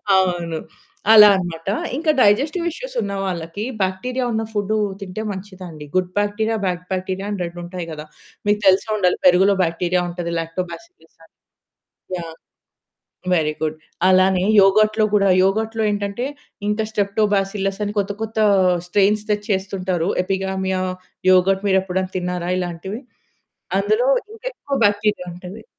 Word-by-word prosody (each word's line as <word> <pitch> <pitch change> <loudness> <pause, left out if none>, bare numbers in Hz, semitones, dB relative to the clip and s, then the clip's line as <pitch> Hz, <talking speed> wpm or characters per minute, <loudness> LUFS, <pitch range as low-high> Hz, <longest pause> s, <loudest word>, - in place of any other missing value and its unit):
అవును. 175 -3 +1 0.6
అలా 210 -1 +10
అన్నమాట. 175 -2 -4 0.3
ఇంకా 315 +1 +2
డైజెస్టివ్ 285 - +3
ఇష్యూసున్న - - -4
వాళ్ళకి 175 +2 -4 0.2
బాక్టీరియా 250 +8 -2
ఉన్న 225 0 0
ఫుడ్డు 210 +1 0 0.2
తింటే 195 +2 -5
మంచిదండి. 185 -6 -9
గుడ్ 185 -1 +1
బాక్టీరియా, 220 +2 0
బాడ్ 180 -1 -2
బాక్టీరియా 190 +1 -3
అని 205 - -3
2 170 0 -6
ఉంటాయి 180 -1 -6
గదా! 150 0 -7 0.4
మీకు 205 0 +3
తెలిసే 190 +3 +4
ఉండాలి 180 -3 +2
పెరుగులో 185 +2 +6
బాక్టీరియా 175 +2 0
ఉంటది. 170 -1 -4
లాక్టోబాసిల్లసని. 180 - -8 0.8
యాహ్! 165 -2 -7 1.0
Very 155 -2 +1
good. 155 0 -1 0.3
అలానే 185 0 +4 0.2
యోగర్ట్‌లో 215 +2 +4
కూడా, 200 -1 +4 0.2
యోగర్ట్‌లో 220 +3 0
ఏంటంటే 205 +4 -2 0.4
ఇంకా 215 +1 0
స్ట్రెప్టోబాసిల్లస్ 200 -1 0
అని 205 +1 -4
కొత్త, 200 +1 -3
కొత్త 220 0 -4 0.5
స్ట్రెయిన్స్ 205 +2 +2
తెచ్చి 210 0 -1
చేస్తుంటారు. 185 -2 -2 0.2
ఎపిగామియా 190 -1 -1 0.5
యోగర్ట్ 190 +2 +3
మీరు 190 - +4
ఎప్పుడైనా 185 0 -3
తిన్నారా 180 0 -3
ఇలాంటివి? 180 +5 -5 0.8
అందులో 475 +4 +1 0.2
ఇంకెక్కువ 450 - -5
బాక్టీరియా 205 -2 0
ఉంటది. 185 +5 -10
195 Hz, 125 wpm, -20 LUFS, 180-210 Hz, 1.0 s, అలా